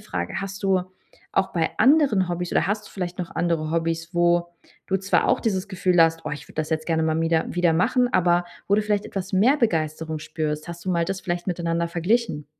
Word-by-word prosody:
Frage: 85 -1 -4
„Hast 195 +1 -6
du 190 -1 +3 0.5
auch 190 - +1
bei 165 -2 0
anderen 265 - +4
Hobbys 175 0 -3
oder - - +2
hast 210 +1 -2
du - - -14
vielleicht 180 -2 -5
noch 175 - -5
andere 165 -3 0
Hobbys, 165 0 -1
wo 175 0 +3 0.4
du 190 - +1
zwar 195 +1 +1
auch - - +3
dieses 195 -3 -1
Gefühl 180 -2 +2
hast: 165 0 +2
‚Oh, - - -3
ich 150 - -6
würde - - -16
das 155 0 -2
jetzt 155 0 -1
gerne 160 -1 +1
mal 160 0 +1
mieder 165 0 +1
wieder 175 -1 +2
machen? 245 +9 +2
Aber 175 0 +3 0.2
wo 200 - +4
du 215 - +2
vielleicht 210 -1 -1
etwas 195 0 -5
mehr 230 +10 +4
Begeisterung 160 - -1
spürst?‘“ 155 0 -4
Hast 170 0 -8
du 185 - -1
mal 170 -1 +1
das 190 +2 -3
vielleicht 175 -1 -3
miteinander 170 -1 -1
verglichen? 175 -2 0
175 Hz, 220 wpm, -24 LUFS, 165-195 Hz, 0.5 s, anderen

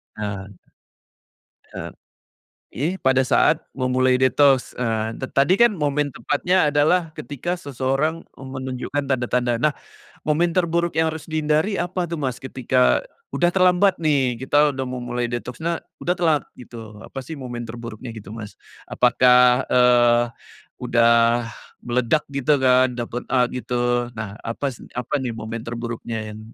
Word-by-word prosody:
Eee 100 -2 -6 1.2
Eee, - - -6 0.9
ini 155 +9 -1
pada 130 0 +3
saat 155 +4 +2
memulai 130 0 +1
detoks, 135 0 +3
eee, 115 -2 -2
ta 130 - -5 0.2
tadi 180 +7 +3
kan 235 0 +5
momen 145 -4 -1
tepatnya 175 +5 +1
adalah 155 +3 +2
ketika 145 +7 -4
seseorang, 140 +2 -2
eee, 135 - -10
menunjukkan 130 +2 -4
tanda-tanda. 125 -2 0
Nah, 150 +2 +3 0.5
momen 165 +3 +1
terburuk 170 -1 0
yang 160 0 +2
harus 160 -1 -8
dihindari 155 +5 0
apa 180 0 -2
tuh, 170 - -4
Mas, 130 -4 -3
ketika 130 - +1 0.3
udah 175 0 +2
terlambat 185 +1 +3
nih, 135 -6 +1
kita 145 +2 +3
udah 135 0 -3
mau 125 0 -4
mulai 120 0 -2
detoksnya 125 +8 -4 0.2
udah 180 - 0
telat 160 -5 +2
gitu. 115 -3 -11
Apa 135 - -7
sih 145 +5 -8
momen 125 -3 -6
terburuknya 115 +1 -8
gitu, 105 -1 -9
Mas? 110 -2 -8 0.3
Apakah, 125 0 +4
eee, 120 -1 +5 0.6
udah 115 0 +3 0.4
meledak 125 +5 +1
gitu 140 +2 +2
kan 130 0 +5
dapet 120 0 -4
a 125 -1 +4
gitu? 120 0 -1
Nah 110 -2 -6
apas 125 +2 -4 0.2
apa 125 +4 -4
nih 125 -2 -2
momen 110 +1 -5
terburuknya 115 -2 -5
yang, 105 - -10
130 Hz, 140 wpm, -22 LUFS, 120-150 Hz, 1.2 s, kan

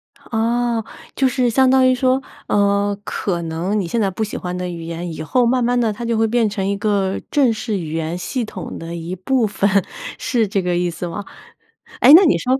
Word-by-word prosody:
啊， 235 +1 -1 0.3
就 270 - +3
是 250 -1 +1
相 260 +2 +4
当 260 0 +5
于 255 - +4
说， 255 +1 +2 0.3
呃， 200 0 +1
可 175 -4 -2
能 170 +6 -2
你 180 - -2
现 235 - -1
在 200 - +2
不 220 - -3
喜 215 - -5
欢 180 0 -4
的 180 0 -3
语 170 -2 -6
言， 170 +1 -5
以 155 - -7
后 245 +10 +1
慢 250 +1 +2
慢 245 +1 +2
地 225 -2 +1
它 235 - -7
就 230 -1 0
会 225 - +3
变 230 -1 +2
成 200 -2 -3
一 200 - 0
个 200 -2 0
正 265 -5 +3
式 215 -1 -3
语 160 -2 -5
言 165 +1 -2
系 240 +6 -3
统 190 -5 -7
的 165 +1 -7
一 170 +2 -5
部 230 +5 +1
分， 200 0 0 0.5
是 230 -3 0
这 195 0 0
个 180 -1 -1
意 175 0 0
思 170 +1 -5
吗？ 200 +4 -5 0.8
诶， 260 - +8
那 360 +5 +10
你 310 - +4
说 255 +1 0
210 Hz, 245 characters per minute, -19 LUFS, 180-245 Hz, 0.8 s, 那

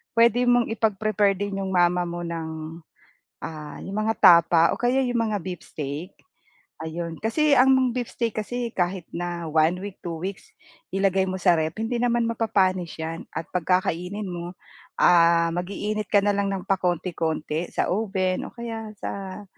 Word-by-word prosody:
puwede 235 +1 +4
mong 245 -1 +3
ipag-prepare 215 -2 +1
din 200 0 -3
'yong 190 -1 -3
mama 175 0 +3
mo 175 0 -5
ng, 160 -1 -5 0.6
ah, 150 -2 -7
'yong 195 +2 -5
mga 220 +1 0
tapa 170 -1 +7
o - - -3
kaya 245 +2 +2
'yong 245 -1 -1
mga 210 - 0
beefsteak, 160 -2 -6 0.7
ayun, 165 +1 -5
kasi 300 +7 +1
ang 260 -1 +5
beefsteak 235 -2 -3
kasi 240 +2 -3
kahit 180 -2 -1
na 175 -1 -4
1 160 +2 +3
week, 200 -2 -7
2 170 -1 -5
weeks, 195 - -7 0.4
ilagay 195 -1 +2
mo 185 - -2
sa 185 -1 +3
ref, 160 0 -2
hindi 225 +2 -2
naman 240 0 +2
mapapanis 190 -6 0
'yan 165 +1 -5
at 165 - -3
'pag 180 +1 +2
kakainin 180 +5 -3
mo, 175 0 -6 0.4
ah, 170 -1 +5
mag-iinit 200 +4 -3
ka 205 - +6
na 205 - +3
lang 200 0 0
ng 195 -2 -3
pakonti-konti 170 -3 -1
sa - - 0
oven 190 -2 -1
o - - -12
kaya 225 -2 -6
sa 195 +1 -6
190 Hz, 160 wpm, -24 LUFS, 170-215 Hz, 0.7 s, tapa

